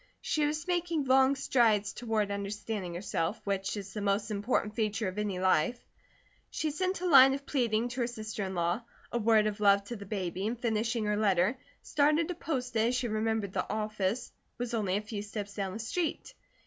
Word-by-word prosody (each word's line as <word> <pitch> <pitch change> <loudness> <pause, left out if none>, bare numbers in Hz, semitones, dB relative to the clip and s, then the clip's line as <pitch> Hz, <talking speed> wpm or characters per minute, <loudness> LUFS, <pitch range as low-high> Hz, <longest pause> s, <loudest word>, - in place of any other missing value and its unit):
She 300 -1 0
was 305 +2 -3
making 345 -4 0
long 265 +1 +4
strides 220 -6 +2
toward 220 -4 -1
understanding 200 -2 -4
herself, 175 +1 -2
which 195 +1 -2
is 195 -1 -7
the 210 - -4
most 205 +2 0
important 210 0 0
feature 220 -1 -1
of 185 +2 -4
any 205 -3 -1
life. 185 +4 +2 0.7
She 310 - -2
sent 370 +4 -1
a - - -2
line 270 -5 +8
of 280 0 -8
pleading 235 -5 +1
to 245 +1 -3
her 235 - +1
sister 215 -3 -5
in 190 0 -4
law, 175 +5 0 0.3
a 240 - 0
word 220 -1 +4
of 210 0 -2
love 200 -1 +5
to 235 +4 -6
the 200 -3 -9
baby, 190 -1 -2
and 230 +1 -3
finishing 230 -1 0
her 210 0 +1
letter, 200 +1 +3 0.3
started 305 +3 +2
to - - -1
post 255 -8 -3
it, 220 0 +3
as 250 - +1
she 245 -1 -1
remembered 215 -2 -1
the - - -2
office 215 +1 -2 0.3
was 245 0 -4
only 200 -4 +1
a - - -2
few 210 -1 -5
steps 205 -1 -6
down 195 -2 -3
the - - -5
street. 280 +10 -3
215 Hz, 200 wpm, -30 LUFS, 200-250 Hz, 0.7 s, line